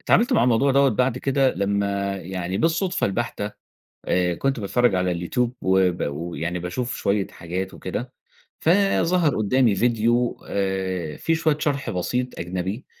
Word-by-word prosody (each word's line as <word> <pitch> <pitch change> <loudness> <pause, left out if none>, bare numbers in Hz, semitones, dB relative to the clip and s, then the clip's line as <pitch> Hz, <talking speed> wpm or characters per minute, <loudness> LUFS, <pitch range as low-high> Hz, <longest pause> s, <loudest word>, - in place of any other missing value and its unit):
اتعاملت 235 +6 +3
مع - - +4
الموضوع 125 +3 +3
دوَّة 140 +1 +5
بعد 125 +1 +1
كده 135 0 +2
لمّا 100 0 -1
يعني 95 0 -4
بالصدفة 170 +3 +1
البحتة 105 0 -3 0.5
آآ، 90 -1 +1
كنت 135 +5 -1
باتفرّج 110 +1 +2
على 90 0 +1
اليوتيوب، 115 +8 -1
وب 95 -1 +2
ويعني 85 +3 -3
باشوف 105 +8 -3
شوية 100 0 0
حاجات 90 +3 -5
وكده 120 +8 -5 0.5
فظهر 180 -3 +3
قدّامي 110 +1 +3
فيديو 120 +2 +1
آآ، 95 -5 -2
في 165 - +1
شوية 160 -2 +1
شرح 145 -2 -1
بسيط 125 +7 -2
أجنبي 95 +6 -4
105 Hz, 140 wpm, -23 LUFS, 95-130 Hz, 0.5 s, دوَّة